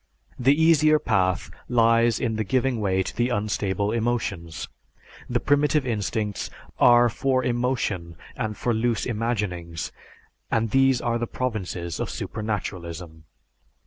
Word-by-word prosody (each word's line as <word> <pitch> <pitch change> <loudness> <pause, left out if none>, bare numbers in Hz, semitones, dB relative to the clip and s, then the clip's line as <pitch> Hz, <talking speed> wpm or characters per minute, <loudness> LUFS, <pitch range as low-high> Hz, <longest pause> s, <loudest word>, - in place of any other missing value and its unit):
The 135 +4 +4
easier 155 -1 +5
path 95 -9 0 0.2
lies 115 -1 +4
in 115 -3 -1
the 110 - 0
giving 125 +3 0
way 95 -2 +1
to - - -6
the 120 +1 +1
unstable 105 -2 -1
emotions. 110 -8 -2 0.6
The - - +1
primitive 145 0 +2
instincts 105 -2 -2 0.3
are 120 0 +7
for 130 +2 0
emotion 120 -9 -1 0.2
and 110 -4 -3
for 120 - 0
loose 115 +1 0
imaginings, 105 -8 -2 0.6
and 115 -1 0
these 135 -1 +4
are 120 0 0
the 120 - -2
provinces 95 -10 -3
of - - -2
supernaturalism. 85 -7 -5
115 Hz, 125 wpm, -25 LUFS, 95-125 Hz, 0.6 s, are